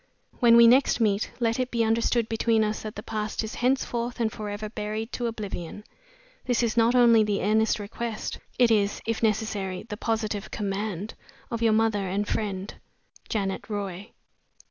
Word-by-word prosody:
When 235 -1 +6
we 235 - +9
next 250 +2 +5
meet, 210 -2 +1
let 230 0 +1
it 255 0 0
be 235 -2 +1
understood 230 +1 +1
between 225 0 +2
us 215 0 -2
that 215 -1 -7
the 210 - -7
past 215 0 -3
is 220 - -5
henceforth 245 -1 0
and 225 -2 +1
forever 210 0 -5
buried 215 +1 -4
to 240 - -2
oblivion. 205 -4 -6 0.6
This 245 -1 +2
is 225 -2 0
not 235 +1 +4
only 235 -3 +6
the 205 -1 -1
earnest 220 +2 +2
request 215 +2 -5 0.2
it 245 -2 +4
is, 205 -2 +1
if 225 0 -2
necessary, 210 -4 -1
the 210 -2 -7
positive 220 -2 -2
command, 205 -1 -3 0.4
of 230 -1 -3
your 225 -1 +4
mother 215 -3 +1
and 200 +3 -1
friend, 200 -2 -3 0.6
"JANET 195 0 -2
ROY. 200 -1 -4
220 Hz, 165 wpm, -26 LUFS, 205-230 Hz, 0.6 s, we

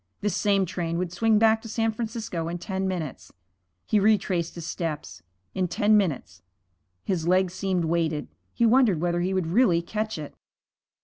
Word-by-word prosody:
This 205 -3 0
same 200 -2 +2
train 170 -1 -3
would 180 -1 -2
swing 220 +3 +3
back 220 0 +4
to 225 - -9
San 225 0 0
Francisco 220 -7 -4
in 170 +1 -3
ten 190 +1 -3
minutes. 170 -7 -5 0.5
He 215 - +2
retraced 195 -5 +1
his 170 -2 -7
steps. 165 -3 -5 0.3
In 185 -1 0
ten 210 +3 +3
minutes 185 -10 -1 0.6
His 170 -4 -2
legs 185 0 +2
seemed 185 -3 -1
weighted. 160 -2 0 0.2
He 235 - +1
wondered 230 -7 +4
whether 175 +1 0
he 190 +2 -1
would 185 -3 0
really 175 -1 +3
catch 215 +3 -3
it. 150 -2 -7
185 Hz, 170 wpm, -26 LUFS, 170-215 Hz, 0.6 s, back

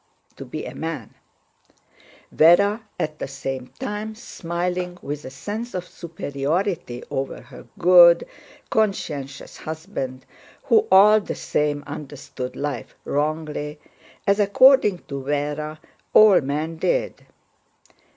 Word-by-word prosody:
* - - -8 1.9
Véra 200 +7 +5 0.2
at 155 -1 -3
the - - -3
same 135 -1 -5
time 215 -3 -4
smiling 180 -4 -4
with 145 +1 -5
a - - -6
sense 210 - -6
of 180 -1 -4
superiority 160 -3 -3
over 135 0 -3
her 125 0 -14
good, 175 -1 +7 0.5
conscientious 150 -10 -2
husband, 135 -5 -6 0.4
who 440 -1 +3
all 210 +3 +8
the - - -5
same 145 -1 -1
understood 140 -3 -7
life 140 -6 -4
wrongly, 150 0 -2 0.5
as 200 0 +3
according 210 0 +5
to 140 -1 -6
Véra 150 +2 -2 0.4
all 215 -3 +8
men 150 +4 -3
did. - - -1
160 Hz, 100 wpm, -23 LUFS, 145-200 Hz, 1.9 s, all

